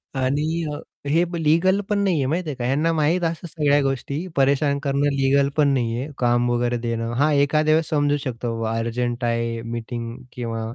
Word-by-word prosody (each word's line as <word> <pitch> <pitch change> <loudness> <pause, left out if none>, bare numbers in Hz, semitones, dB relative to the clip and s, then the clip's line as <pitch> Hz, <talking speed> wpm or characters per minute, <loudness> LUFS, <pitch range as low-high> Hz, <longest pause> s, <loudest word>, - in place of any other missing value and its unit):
आणि 150 +6 0
अ, - - -4 0.3
हे 165 +4 +3 0.2
लीगल 180 +6 +3
पण 210 - +1
नाही 190 -4 +2
आहे 135 - +1
माहिती 165 +3 -1
आहे 145 - -4
का? 120 - -3
ह्यांना 150 +6 +1
माहीत 160 +3 +1
असं 165 +1 -2
सगळ्या 145 -3 +2
गोष्टी 140 +5 -2
परेशान 140 +1 +2
करणं 140 0 +1
लीगल 140 +1 +3
पण 145 -2 +4
नाहीये, 120 +1 -1
काम 120 0 +2
वगैरे 120 0 0
देणं. 115 0 -3
हां, 150 +2 +3
एखाद्या 155 +2 +3
वेळेस 160 0 0
समजू 145 -1 +2
शकतो 120 -2 -3
बाबा 115 0 -1
अर्जंट 120 +1 -2
आहे 115 0 -1
मीटिंग 115 0 -5 0.2
किंवा 115 -2 -4
140 Hz, 185 wpm, -22 LUFS, 120-155 Hz, 0.3 s, पण